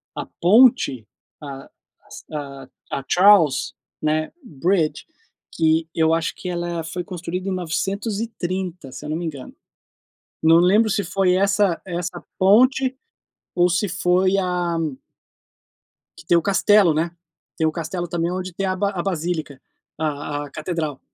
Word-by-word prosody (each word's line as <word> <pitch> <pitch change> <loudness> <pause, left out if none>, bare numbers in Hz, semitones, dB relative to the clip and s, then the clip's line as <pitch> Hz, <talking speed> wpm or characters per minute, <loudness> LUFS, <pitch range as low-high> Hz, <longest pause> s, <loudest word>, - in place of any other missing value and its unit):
a - - -4 0.2
ponte, 180 - +4 0.3
a 135 -2 -9 1.2
a 135 - -3
Charles 180 -8 +5 0.7
Bridge, 160 - -1
né, - - -40 0.4
que 160 0 +1
eu 160 0 +3
acho 165 0 -1
que - - -8
ela 175 -1 -3
foi 175 +3 -5
construída 180 +1 -5
em - - -2
930, 185 - -3
se 150 - -9
eu - - -5
não 155 - -1
me 170 - -4
engano, 145 -5 -7 0.9
não 160 +1 +6
lembro 205 +6 +4
se 205 0 0
foi 185 +1 +1
essa 195 -2 +2
essa 175 -1 -5
ponte 255 +7 +4 0.6
ou 175 0 +4
se 180 +4 +1
foi 185 +2 +2
a 180 -3 -1 1.4
que - - -14
tem 175 - +4
o - - +2
castelo, 200 -1 +4
né, 165 +2 -1 0.5
tem 160 - +2
o - - +1
castelo 175 +2 -4
também 170 0 -1
onde 185 0 -4
tem 195 +3 -2
a 185 - +1
a 185 -1 -2
basílica, 165 -6 -3 0.4
a 145 -1 -3
a 140 - -13
catedral, 155 -2 -4
175 Hz, 140 wpm, -22 LUFS, 160-190 Hz, 1.4 s, não